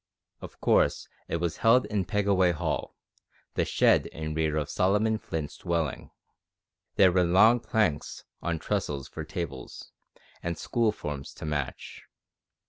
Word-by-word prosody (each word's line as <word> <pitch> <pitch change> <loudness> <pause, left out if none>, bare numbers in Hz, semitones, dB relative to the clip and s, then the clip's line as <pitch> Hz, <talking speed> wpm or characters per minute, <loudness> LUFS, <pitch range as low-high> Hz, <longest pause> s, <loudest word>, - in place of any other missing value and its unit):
Of - - -10
course - - +2 0.2
it - - -2
was 85 -1 -2
held 120 +3 +4
in 100 -3 -1
Pegaway 100 -4 +2
Hall, 75 - -3 0.6
the - - +1
shed - - +3
in 80 0 -5
rear 80 -1 0
of 75 -2 -1
Solomon 105 +6 +1
Flint's 80 -7 -5
dwelling. 85 -5 -2 0.9
There 95 -2 +6
were 90 0 +3
long 105 +8 +5
planks 105 -11 -1 0.2
on 85 -1 -1
trestles 70 -3 -2
for 80 - -7
tables, 75 -6 -7 0.5
and 85 -1 -3
school 115 -2 +1
forms 75 -8 -6
to - - -8
match. 75 -3 -4
85 Hz, 135 wpm, -28 LUFS, 75-100 Hz, 0.9 s, There